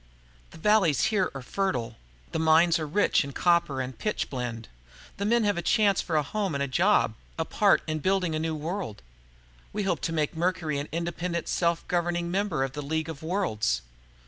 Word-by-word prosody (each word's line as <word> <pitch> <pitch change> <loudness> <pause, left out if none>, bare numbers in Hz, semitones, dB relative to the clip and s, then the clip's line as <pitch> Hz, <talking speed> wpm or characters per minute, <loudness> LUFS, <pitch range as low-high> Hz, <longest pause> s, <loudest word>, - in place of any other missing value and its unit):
"The - - -13
valleys 170 - +3
here 190 -3 +2
are 135 - -6
fertile. 125 - -2 0.4
There 160 - -1
are - - 0
mines 165 +2 +5
rich 155 +5 +2
in 140 0 -7
copper 170 -6 +2
and 130 0 -5
pitchblende. 125 - -3 0.5
The 200 - -2
men 235 +2 +3
have 205 -3 +1
a - - -2
chance 200 +2 +3
for 165 - -3
a 150 - +3
home 195 +1 -2
and 140 - 0
a - - -1
job, 170 - +3 0.2
a 160 - -1
part 205 +3 +3
in 155 -1 -2
building 185 0 +1
a 155 - -1
new 160 0 -1
world. 155 - -4 0.7
We 210 0 -2
hope 180 -5 0
to - - -1
make 155 -1 -1
Mercury 165 -3 0
an 145 - -5
independent, 170 +1 -3
self 170 -1 0
governing 175 0 0
member 190 -7 0
of 135 -1 -3
the 145 - -4
League 160 +2 -2
of 155 -3 -7
Worlds." 110 - 0
165 Hz, 195 wpm, -27 LUFS, 145-185 Hz, 0.7 s, mines